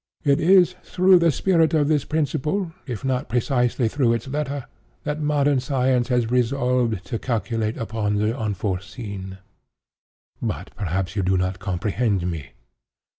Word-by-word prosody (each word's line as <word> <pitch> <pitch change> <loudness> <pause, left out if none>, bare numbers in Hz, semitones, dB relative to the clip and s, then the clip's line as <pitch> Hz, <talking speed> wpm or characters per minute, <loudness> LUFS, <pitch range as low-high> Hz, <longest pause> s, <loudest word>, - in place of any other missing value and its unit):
It 140 -2 +3
is 180 +1 +5
through 185 0 +4
the 170 0 +4
spirit 165 +1 +2
of 145 -2 +3
this 150 -2 +1
principle, 155 +4 -1 0.2
if 120 -2 -5
not 130 -3 -1
precisely 125 0 +1
through 120 -1 +2
its 115 +2 -3
letter, 140 -1 -3 0.4
that 150 +1 -3
modern 145 -2 +2
science 130 -1 +1
has 120 -2 +1
resolved 125 -4 +1
to 115 - -3
calculate 115 -2 -2
upon 110 -2 -2
the 105 +3 +1
unforeseen. 100 -2 -4 1.0
But - - -4
perhaps 95 +1 -2
you 100 - +1
do 95 0 +2
not 90 0 -1
comprehend 100 +1 -1
me. 70 -7 -7
125 Hz, 140 wpm, -23 LUFS, 105-145 Hz, 1.0 s, is